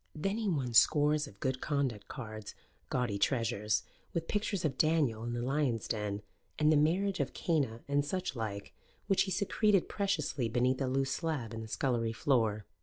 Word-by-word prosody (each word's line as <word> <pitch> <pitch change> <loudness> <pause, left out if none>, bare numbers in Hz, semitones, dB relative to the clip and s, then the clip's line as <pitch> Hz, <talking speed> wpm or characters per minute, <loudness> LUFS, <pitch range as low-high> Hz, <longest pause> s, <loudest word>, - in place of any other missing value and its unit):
Then 195 +8 -1
he 215 -3 0
won 135 -8 -1
scores 150 +4 +5
of 100 - -15
good 130 -1 -1
conduct 135 -8 -1
cards, 110 -6 -7 0.3
gaudy 120 -5 -1
treasures, 110 -3 +1 0.3
with 165 -1 -1
pictures 205 -4 -1
of 140 -4 0
Daniel 145 -7 +2
in 120 0 -3
the 120 0 -2
Lions' 130 -4 0
Den 105 -2 -2 0.3
and 150 0 +4
the - - +5
Marriage 180 +6 +2
of - - -2
Cana 140 - 0
and 140 0 +2
such 180 0 -3
like, 105 -4 -4 0.3
which 195 -2 +3
he - - -3
secreted 200 +1 +2
preciously 155 - -1
beneath 125 +3 +1
a 135 - +1
loose 135 +1 0
slab 145 -8 -2
in 115 - -5
the 110 - -7
scullery 115 -1 0
floor. 110 -5 +1
135 Hz, 180 wpm, -32 LUFS, 115-155 Hz, 0.3 s, scores